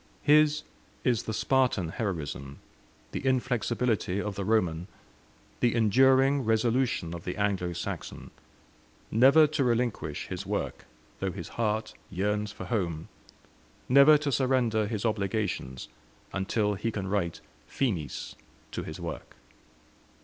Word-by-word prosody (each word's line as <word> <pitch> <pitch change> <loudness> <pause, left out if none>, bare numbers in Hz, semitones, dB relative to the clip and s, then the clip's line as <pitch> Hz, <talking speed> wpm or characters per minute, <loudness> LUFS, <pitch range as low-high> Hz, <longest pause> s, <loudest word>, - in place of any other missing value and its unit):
His 150 0 +4 0.4
is 120 -4 +2
the - - -5
Spartan 120 -7 +1
heroism, 75 - -4 0.5
the - - -4
inflexibility 120 -5 0
of 105 0 -3
the 100 0 -4
Roman, 90 -5 +1 0.7
the 120 -1 +2
enduring 130 +5 +4
resolution 115 -5 +1
of 85 -1 -7
the 90 - -4
Anglo 100 -4 0
Saxon 85 - -6 0.8
never 135 +7 +7
to 150 -1 0
relinquish 120 -2 -1
his - - -5
work, - - -3 0.3
though - - -1
his - - -7
heart 110 -1 -1 0.2
yearns 105 +3 -1
for - - -8
home; 85 -9 -2 0.8
never 140 +4 +7
to 145 -1 -2
surrender 120 -5 +2
his 110 0 -3
obligations 100 - -2 0.5
until 105 +2 0
he 105 +4 -2
can 100 -4 -4
write 95 -4 -1 0.3
Finis 90 - -2 0.4
to - - -3
his - - -7
work. - - -7
110 Hz, 120 wpm, -28 LUFS, 95-125 Hz, 0.8 s, never